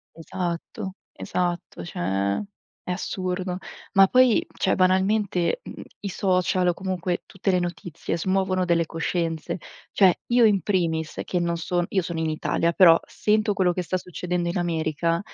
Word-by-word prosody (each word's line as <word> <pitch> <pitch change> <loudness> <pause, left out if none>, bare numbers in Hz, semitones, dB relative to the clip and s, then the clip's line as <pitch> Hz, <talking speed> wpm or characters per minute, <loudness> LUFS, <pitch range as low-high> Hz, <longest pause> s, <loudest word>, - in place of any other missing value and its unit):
Esatto. 180 +4 -4 0.2
Esatto. 175 - -3
Cioè, 95 +3 -1 0.5
è - - -4
assurdo. 185 0 -3 0.4
Ma 195 -1 +7
poi, 255 +1 +4
cioè 190 - +1
banalmente, 190 - +2
mhmm, - - -9 0.2
i 200 - -3
social 185 -1 +1
o 175 - +3
comunque 185 -1 -2
tutte 195 +1 -3
le 180 - +3
notizie, 175 -2 -4
smuovono 185 +1 +1
delle 170 -1 +2
coscienze. 165 0 -2 0.3
Cioè, 190 -4 +4
io 240 -1 +5
in 200 -4 +4
primis 165 -5 -1
che 180 - -1
non 170 -1 0
son 175 +1 -1
io 190 - +1
sono 170 -1 -4
in 160 -1 0
Italia, 165 +2 0
però 170 -4 +7
sento 215 0 +1
quello 185 -3 +2
che 180 - -2
sta 185 +2 -1
succedendo 180 -1 -3
in 175 - -2
America 165 -1 0
180 Hz, 155 wpm, -24 LUFS, 170-190 Hz, 0.5 s, Ma